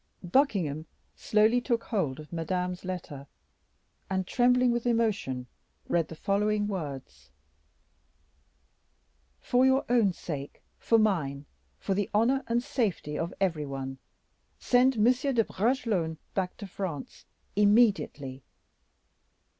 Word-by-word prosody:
Buckingham 175 - +1 0.3
slowly 220 +3 +3
took 235 -2 0
hold 155 - -2
of 150 +2 -11
Madame's 180 +2 -2
letter, 160 -7 -6 0.8
and 190 -1 -1
trembling 250 +3 +3
with 240 0 -1
emotion, 210 - 0 0.4
read 170 -2 +1
the 160 - -9
following 205 +4 +1
words: 135 - -6 2.1
"For 250 +1 +2
your 265 +1 +3
own 235 -5 +4
sake, 145 -5 -7 0.2
for 230 - +3
mine, 155 -10 0 0.3
for 195 - -2
the 200 0 -1
honor 255 +6 +3
and 235 +1 +1
safety 225 - -2
of 165 +3 -2
every 165 -7 0
one, 135 -1 -5 0.6
send 255 +1 +3
M. 210 - +3
de 250 0 +3
Bragelonne 205 -7 0 0.2
back 185 -2 -2
to 205 - -7
France 185 -6 -6 0.3
immediately. 205 - +2
195 Hz, 115 wpm, -28 LUFS, 155-235 Hz, 2.1 s, own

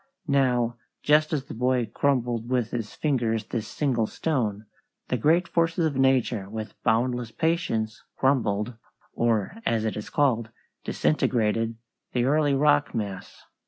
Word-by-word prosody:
Now, 125 -4 +2 0.3
just 155 +1 +4
as 145 -4 -1
the - - -8
boy 125 +1 +1
crumbled 120 -2 0
with 125 -3 0
his 115 -4 -4
fingers 115 -7 0
this 110 -1 -4
single 120 -5 0
stone, 110 -10 -2 0.4
the - - +1
great 165 +8 +3
forces 165 0 +1
of 150 -3 -1
nature 130 -6 +2
with 110 0 -6
boundless 120 0 +1
patience 115 -6 -1 0.2
crumbled, 120 -4 +1 0.4
or, 115 - 0
as 115 - 0
it 110 - -1
is 105 - -6
called, 120 -6 +1 0.3
disintegrated, 115 -5 +1 0.4
the 125 -1 +1
early 145 0 +3
rock 145 +1 +3
mass. 100 -4 -5
125 Hz, 135 wpm, -26 LUFS, 110-140 Hz, 0.4 s, just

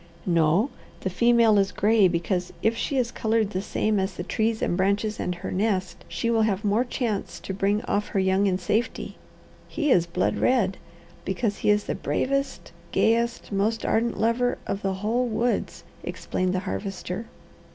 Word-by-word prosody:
"No. 170 - +3 0.3
The 190 - -2
female 235 0 +4
is 195 0 +1
gray, 210 +1 +4
because 175 +1 -1
if 225 +1 +3
she 275 +4 -2
is 245 -2 +1
coloured 220 -2 0
the 185 - -2
same 215 0 0
as 190 -1 -2
the 175 - -4
trees 220 +3 0
and - - +1
branches 200 +3 0
and 180 - -2
her 180 +2 -6
nest, 190 -2 -1
she 235 - -1
will 225 -1 +3
have 210 -1 0
more 210 +4 +3
chance 235 -5 -3
to 190 - -5
bring 200 +2 +1
off 205 +1 -1
her 195 - -1
young 190 +1 +2
in 185 -1 +1
safety. 215 +4 -2 0.5
He 300 -3 0
is 170 -7 +4
blood 180 +2 0
red, 210 -7 +2 0.5
because 200 +2 -1
he - - +1
is 210 0 +4
the - - -2
bravest, 275 +1 -2 0.2
gayest, 235 +1 +1
most 210 +3 0
ardent 230 +1 +1
lover 230 +2 +1
of 195 - -3
the 195 -1 0
whole 245 +3 +1
woods," 230 +2 -1 0.2
explained 185 0 -2
the 185 - 0
Harvester. 195 +1 -4
210 Hz, 175 wpm, -25 LUFS, 190-230 Hz, 0.5 s, female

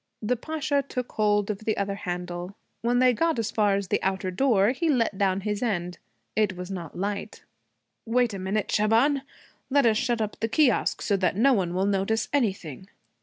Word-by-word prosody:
The 245 +4 +1
Pasha 300 +2 -1
took 250 -1 -4
hold 210 -1 +1
of 200 - -5
the 220 0 -2
other 200 0 -1
handle. 180 0 -5 0.3
When 240 +1 +1
they 250 0 +5
got 330 +4 +1
as 225 -1 -1
far 205 -2 +2
as 195 -2 -3
the - - +1
outer 190 0 -1
door 215 -1 +3
he 295 +6 -1
let 235 -7 +1
down 190 -1 +1
his 210 0 -2
end. 180 -7 -2 0.4
It 210 -4 +1
was 180 +1 -6
not 170 -5 -6
light. 200 +2 -4 0.6
'Wait 240 -1 +2
a 195 - -5
minute, 195 +3 -2
Shaban. 230 +7 +3 0.5
Let 280 -1 +3
us 220 -2 +4
shut 240 -1 0
up 215 -1 -3
the 225 - 0
kiosque, 250 0 +2
so 200 - +1
that 185 -2 +1
no 265 +7 +4
one 180 -5 0
will 190 +1 +1
notice 200 +3 0
anything.' 190 - -1
210 Hz, 195 wpm, -26 LUFS, 190-245 Hz, 0.6 s, they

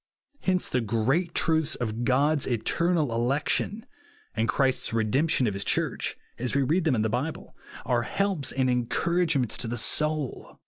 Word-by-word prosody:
Hence 185 -1 0
the 125 - 0
great 125 - 0
truths 160 -2 +1
of 115 0 -3
God'a 140 +3 +2
eternal 155 +4 0
election, 140 - 0 0.5
and 110 +1 -1
Christ's 130 +2 +1
redemption 130 +6 +1
of 105 - 0
his 100 +1 -2
Church, - - 0 0.2
as 125 +2 -2
we 140 - +3
read 165 +6 +1
them 150 -5 +3
in 110 - +1
the - - +1
Bible, 125 +8 -4 0.3
are 120 -1 +1
helps 175 - -1
and 130 -1 0
encouragements 135 - +1
to 120 - 0
the 120 +1 -3
soul. 150 +3 0
130 Hz, 155 wpm, -26 LUFS, 120-160 Hz, 0.5 s, we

